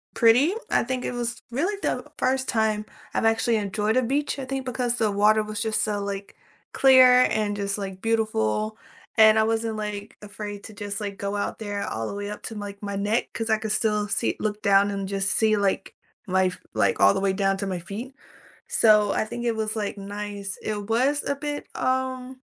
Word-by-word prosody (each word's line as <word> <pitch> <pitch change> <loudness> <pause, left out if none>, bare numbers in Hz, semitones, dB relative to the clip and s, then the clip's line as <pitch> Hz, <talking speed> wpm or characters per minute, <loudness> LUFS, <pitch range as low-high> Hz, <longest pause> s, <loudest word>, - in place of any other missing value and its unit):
pretty, 245 +7 +5 0.2
I - - +3
think 255 +1 -3
it - - -2
was 240 -1 -3
really 335 - 0
the - - -1
first 260 0 0
time 215 -2 +1 0.3
I've - - 0
actually 225 +1 +2
enjoyed 210 +2 -1
a - - +5
beach, 280 +4 -1
I 270 - -4
think, 265 0 -4
because 245 -1 -1
the 220 -3 +1
water 210 +2 +4
was 215 0 -4
just 220 -1 +1
so, 205 -1 -1
like, 200 0 -5 0.4
clear 255 -1 +7
and 215 -1 0
just, 200 0 -2
like, 190 -2 -6
beautiful, 215 - 0 0.4
and 220 0 +7
I - - +5
wasn't, 225 0 -1
like, 210 -1 -5
afraid 205 0 -7
to 220 - -10
just, 205 0 -5
like, 200 -2 -5
go 200 0 -2
out 205 - -3
there 205 -2 -3
all 110 0 -3
the - - -5
way 205 0 -4
up 210 - -7
to, 225 - -7
like, 205 -1 -7
my 200 -1 -3
neck 210 +4 0
'cause 225 0 -3
I 220 - +3
could 220 -1 -3
still 210 -1 +1
see 230 - +1
look 210 -1 -2
down 200 0 +4
and 195 -1 -3
just 195 0 0
see, 220 -1 +3
like, 195 -1 -1 0.3
life, 185 -1 +1
like, 100 -3 +1
all 100 0 +6
the - - -1
way 195 -1 +2
down 195 0 +1
to 200 0 -3
my 185 -2 -2
feet. 210 +10 -7 0.6
So 210 -2 +4
I - - 0
think 240 +2 -6
it 230 -1 0
was, 220 0 -2
like, 210 -1 -2
nice. 205 0 -5
It 210 -1 -4
was 265 +6 +2
a 280 - 0
bit, 290 0 -5
um, 255 0 -2
215 Hz, 210 wpm, -25 LUFS, 200-235 Hz, 0.6 s, clear